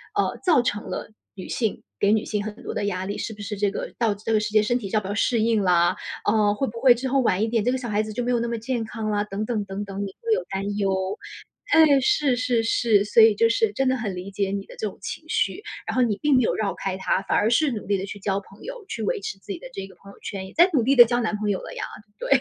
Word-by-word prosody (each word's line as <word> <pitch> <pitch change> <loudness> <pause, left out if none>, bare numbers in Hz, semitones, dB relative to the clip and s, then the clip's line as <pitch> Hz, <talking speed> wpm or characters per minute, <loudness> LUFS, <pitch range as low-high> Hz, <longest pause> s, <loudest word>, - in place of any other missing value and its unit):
呃， - - 0
造 330 -9 +4
成 210 -3 -2
了 - - -5 0.2
女 185 - -8
性 225 -4 -2 0.2
给 205 +1 +4
女 215 - +2
性 210 -1 -2
很 215 -1 -5
多 - - -5
的 205 - -2
压 185 -2 -2
力， 200 - -4
是 220 - -4
不 205 - -11
是 205 0 -5
这 205 0 +2
个 - - -5
到 220 -3 +2
这 220 +2 -4
个 215 - +4
世 210 0 -3
界 215 0 +4
身 240 +3 +1
体 200 - -5
要 215 - +3
不 190 - -7
要 200 - -2
适 225 +1 +1
应 225 -2 +2
啦？ 175 -1 +3 0.3
呃， 205 -1 +3
会 270 +6 -1
不 230 +1 -8
会 245 -1 +6
之 260 +2 -3
后 275 +1 +2
晚 215 -4 +2
一 225 - 0
点， 230 -2 +1
这 250 - +2
个 - - 0
小 240 -3 -5
孩 210 0 +1
子 215 0 -6
就 245 - -2
没 245 - 0
有 240 - +2
那 235 - -1
么 235 0 -2
健 230 0 -2
康 220 -1 -4
啦？ 205 0 0
等 205 +1 -4
等 215 -4 -2
等 195 +1 -5
等， 200 -1 -7
你 195 - -7
会 460 -1 -2
有 - - 0
担 200 +1 -3
忧。 190 0 -1 0.5
哎， 305 -4 +6
是 265 -1 +2
是 245 -2 +1
是， 220 -3 +3
所 225 - +5
以 220 -2 +7
就 230 +2 +4
是 225 -2 +2
真 270 +4 0
的 260 - +3
很 210 -6 -3
理 185 +2 -7
解 195 0 -1
你 200 0 -3
的 - - -13
这 215 - -3
种 - - -9
情 - - -5
绪， 405 - 0 0.3
然 - - -2
后 255 - +3
你 215 -4 +1
并 295 -3 +3
没 255 - +5
有 - - +1
绕 205 -2 -1
开 190 -1 -4
它， 190 - 0
反 - - 0
而 210 - +3
是 275 +5 +3
努 215 -4 -5
力 200 - +1
地 195 +1 -3
去 205 - -7
交 195 0 -1
朋 195 0 -17
友， - - -7
去 225 - -4
维 200 - -1
持 195 - -5
自 195 +1 -10
己 - - -5
的 - - -9
这 195 -5 -6
个 190 - -14
朋 200 +2 -15
友 - - -18
圈 190 -1 -6
也 - - -14
在 345 +3 +6
努 260 - +4
力 270 +4 +3
地 240 -1 +10
交 240 +1 0
男 215 -2 -1
朋 210 0 -2
友 190 - -1
了 - - -9
呀， - - -4 0.3
对。 - - -5
215 Hz, 330 characters per minute, -24 LUFS, 200-240 Hz, 0.5 s, 地